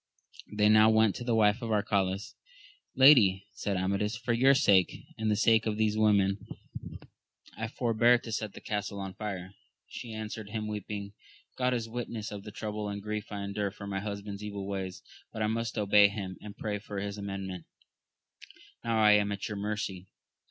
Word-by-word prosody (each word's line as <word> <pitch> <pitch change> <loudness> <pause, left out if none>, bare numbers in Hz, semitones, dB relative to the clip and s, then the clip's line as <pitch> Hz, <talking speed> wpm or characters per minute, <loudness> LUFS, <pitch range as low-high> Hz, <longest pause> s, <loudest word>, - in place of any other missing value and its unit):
They 105 0 +3
now 110 +1 +7
went 110 -2 +4
to - - -6
the 120 -1 +1
wife 110 +2 +3
of 115 - -4
Arcalaus. 100 -2 0 0.6
Lady, 110 -9 +6
said 100 -1 -2
Amadis, 100 +4 0
for 120 0 -1
your 135 +4 +5
sake, 100 -10 +3
and 110 -1 -1
the 105 - +3
sake 110 +1 +3
of 105 -1 -1
these 110 -1 +1
women, 100 -2 +3 1.2
I 110 +2 -3
forbear 120 0 +3
to 115 - -9
set 110 -2 -3
the - - -11
castle 105 -1 -3
on 95 -1 -5
fire. 95 -4 -5 0.4
She 120 - -8
an 110 0 -5
swered 110 -1 -7
him 110 0 -3
weeping, 105 -1 -5 0.4
God 125 0 +1
is 115 -2 -3
witness 115 -2 -5
of 105 -1 -6
the 105 - -9
trouble 105 0 -4
and 100 0 -4
grief 105 +1 -5
I 100 -1 -4
endure 100 0 -2
for 100 - -10
my 100 -1 -3
husband's 100 0 -6
evil 100 -2 -5
ways; 95 -2 -4 0.3
but 110 - -3
I. - - +2
must 115 +1 -2
obey 105 0 +6
him, 100 -2 -5
and 105 -1 -10
pray 105 -1 -3
for 100 0 -8
his 100 +1 -4
amendment: 95 -3 -5 1.2
now 115 -1 0
I 105 -1 +6
am 105 -1 +4
at 100 -1 -3
your 105 - -5
mercy. 100 -2 -3
105 Hz, 185 wpm, -30 LUFS, 100-110 Hz, 1.2 s, now